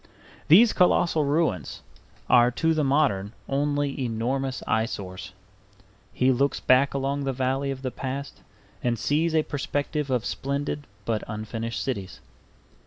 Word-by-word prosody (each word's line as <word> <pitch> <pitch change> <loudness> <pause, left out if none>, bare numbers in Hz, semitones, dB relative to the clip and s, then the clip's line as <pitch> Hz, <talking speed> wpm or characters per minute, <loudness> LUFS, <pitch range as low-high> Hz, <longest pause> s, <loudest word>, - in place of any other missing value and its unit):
These 215 +9 +7
colossal 170 -3 +3
ruins 140 - -1 0.4
are 120 0 +6
to 160 +6 +1
the 155 -1 +1
modern 135 -8 +1
only 145 0 -1
enormous 130 +3 -2
eyesores. 95 -4 -2 0.8
He 130 +1 +2
looks 140 +3 +1
back 130 +2 +3
along 140 +1 -1
the 135 - -1
valley 135 +2 -1
of 135 -1 -5
the 130 - -2
past 135 +3 -6 0.4
and 120 -1 +1
sees 155 +7 +1
a 155 - +4
perspective 145 +1 -2
of 125 -3 0
splendid 140 +1 -3 0.2
but 110 -2 -1
unfinished 115 +2 -4
cities. 100 -8 -4
135 Hz, 130 wpm, -25 LUFS, 120-145 Hz, 0.8 s, These